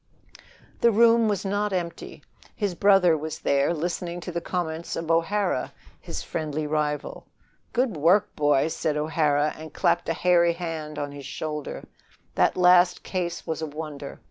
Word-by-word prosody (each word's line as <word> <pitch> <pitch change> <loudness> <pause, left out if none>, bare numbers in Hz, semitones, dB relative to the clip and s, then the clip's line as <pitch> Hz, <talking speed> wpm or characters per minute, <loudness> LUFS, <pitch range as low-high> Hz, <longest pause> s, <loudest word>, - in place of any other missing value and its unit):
The 235 - +5
room 230 +1 +5
was 205 -2 -1
not 205 +1 0
empty. 175 -3 -5 0.3
His 205 -4 -1
brother 195 -2 +4
was 155 +1 -5
there, 140 +3 +1
listening 175 +1 -3
to 180 - -6
the 170 0 -3
comments 170 -2 -3
of 165 0 -2
O'Hara, 170 -2 0 0.3
his - - -6
friendly 155 -1 -3
rival. 150 -1 -2 0.4
"Good 245 -5 0
work, 175 +7 +3
boy!" 145 0 +2
said 155 -1 -1
O'Hara, 150 -1 +1
and 155 -1 -11
clapped 175 - +1
a - - +2
hairy 170 0 +3
hand 160 -3 -5
on 145 0 -3
his 140 -1 -9
shoulder. 150 -1 -5 0.5
"That - - +2
last 180 0 +5
case 175 -2 -3
was 160 0 -3
a 160 - -2
wonder. 150 -2 -7
165 Hz, 155 wpm, -25 LUFS, 150-180 Hz, 0.5 s, The